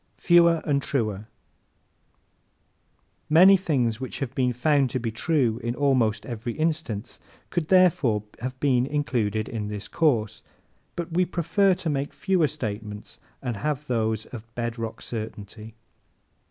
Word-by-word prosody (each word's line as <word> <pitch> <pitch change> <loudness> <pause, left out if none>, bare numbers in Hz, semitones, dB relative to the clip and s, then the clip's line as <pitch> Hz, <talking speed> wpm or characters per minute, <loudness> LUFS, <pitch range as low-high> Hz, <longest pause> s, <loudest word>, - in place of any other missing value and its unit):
Fewer 170 -2 +4
and 140 -2 +1
Truer 110 -9 -1
¶ 105 - -11 2.0
Many 180 +5 +8
things 130 - 0
which 130 - -5
have 135 -4 -4
been 125 -1 +1
found 135 +2 +2
to 130 - -2
be 115 -1 -3
true 120 -2 +1
in 120 +1 -2
almost 125 -7 +1
every 120 -1 -5
instance 155 -9 -3 0.3
could 170 -4 -2
have 130 - +2
been 130 -3 +2
included 120 -7 -1
in 110 -3 -4
this 105 0 -5
course. 110 -9 0 0.5
But 170 -1 -5
we 180 +2 +3
prefer 185 +3 +2
to 170 - -3
make 140 0 -3
fewer 185 -5 +2
statements 105 -7 -6 0.2
and 120 -4 -3
have 150 +3 -2
those 110 -4 -1
of 115 -1 -8
bedrock 115 -1 -4
certainty. 110 -1 -7
125 Hz, 135 wpm, -25 LUFS, 110-155 Hz, 2.0 s, Many